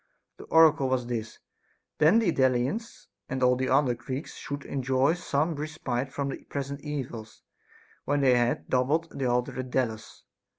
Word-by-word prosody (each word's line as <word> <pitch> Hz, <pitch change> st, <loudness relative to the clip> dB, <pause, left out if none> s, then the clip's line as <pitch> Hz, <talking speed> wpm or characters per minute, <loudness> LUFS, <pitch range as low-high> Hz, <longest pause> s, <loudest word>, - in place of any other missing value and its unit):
The -, -, -11 dB
oracle 160 Hz, -4 st, +5 dB
was 130 Hz, -2 st, 0 dB
this: 115 Hz, -2 st, -4 dB, 0.3 s
" -, -, -44 dB
Then 155 Hz, +8 st, +6 dB
the 220 Hz, -7 st, +3 dB
Delians 130 Hz, -, 0 dB, 0.2 s
and 130 Hz, -1 st, -2 dB
all 125 Hz, 0 st, +5 dB
the 130 Hz, +1 st, -1 dB
other 135 Hz, -2 st, +3 dB
Greeks 130 Hz, +4 st, -6 dB
should 145 Hz, 0 st, -6 dB
enjoy 135 Hz, +2 st, +1 dB
some 165 Hz, -2 st, -1 dB
respite 140 Hz, -4 st, -3 dB
from 140 Hz, 0 st, -2 dB
their -, -, -6 dB
present 140 Hz, 0 st, -4 dB
evils, 130 Hz, -7 st, -6 dB, 0.6 s
when 145 Hz, 0 st, +1 dB
they 130 Hz, -2 st, +5 dB
had 120 Hz, 0 st, 0 dB
doubled 145 Hz, +6 st, +1 dB
the 135 Hz, -, -3 dB
altar 125 Hz, +1 st, 0 dB
at 130 Hz, 0 st, -4 dB
Delos." 115 Hz, -4 st, -3 dB
135 Hz, 165 wpm, -27 LUFS, 125-150 Hz, 0.6 s, Then